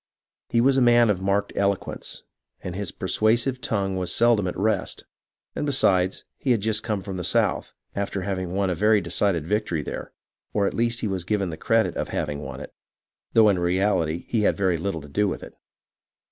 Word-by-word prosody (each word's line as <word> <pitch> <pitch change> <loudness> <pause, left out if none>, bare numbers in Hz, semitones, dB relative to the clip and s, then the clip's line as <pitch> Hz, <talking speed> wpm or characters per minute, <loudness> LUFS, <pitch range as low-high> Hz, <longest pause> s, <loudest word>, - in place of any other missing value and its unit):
He 115 - +3
was 135 +2 +4
a - - +4
man 120 -2 +5
of 95 -2 -2
marked 100 +1 0
elo 100 0 +3
quence, - - -8 0.4
and 90 -1 -5
his 100 -2 -4
persuasive 115 +7 +1
tongue 100 -4 -1
was 90 -1 -2
seldom 115 -4 +3
at 90 - -4
rest; 105 0 -1 0.5
and - - -2
besides, 95 -10 +2 0.2
he 135 - -3
had 120 -3 +4
just 110 +1 0
come 105 -4 -2
from 95 -1 -6
the 90 - -4
South, - - +1 0.2
after 100 -1 -2
having 95 -2 -3
won 95 0 0
a - - +1
very 105 +5 +3
decided 85 -2 0
victory 90 -5 -1
there; - - -6 0.4
or 100 -1 +2
at - - 0
least 115 +1 0
he - - 0
was 95 -3 -2
given 95 -1 -1
the - - -5
credit 110 -1 +1
of - - -2
having 75 -2 -3
won 65 -2 -7
it, - - -9 0.6
though 110 -1 +6
in 100 -3 +3
reality 85 -2 +1
he 115 - 0
had - - +2
very 95 -4 +1
little 85 -2 -3
to 75 - -11
do 105 +8 +1
with 95 - -4
it. - - -10
100 Hz, 205 wpm, -24 LUFS, 90-110 Hz, 0.6 s, though